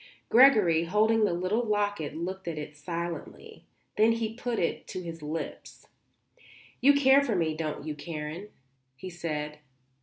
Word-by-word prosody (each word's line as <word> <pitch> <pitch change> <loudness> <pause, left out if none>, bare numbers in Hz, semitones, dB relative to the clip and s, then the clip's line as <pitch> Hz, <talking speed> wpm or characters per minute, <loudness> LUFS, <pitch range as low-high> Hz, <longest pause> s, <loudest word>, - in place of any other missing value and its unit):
Gregory, 210 -11 +6
holding 215 +4 +3
the - - +1
little 185 +6 0
locket, 205 -8 -1
looked 185 +2 -5
at 165 -2 -3
it 150 0 -7
silently. 170 +2 -6 0.3
Then 220 +2 +5
he 225 -1 -2
put 240 0 -3
it 170 - -2
to 185 - -6
his 165 -1 -7
lips. 155 +2 -6 1.0
"You 280 +3 +6
care 275 0 +6
for 240 -7 -1
me, 165 -3 +1
don't 155 -2 -4
you, 155 - -3
Karen?" 155 +5 -6 0.5
he 180 +8 -8
said. 150 -3 -4
175 Hz, 150 wpm, -28 LUFS, 160-220 Hz, 1.0 s, Gregory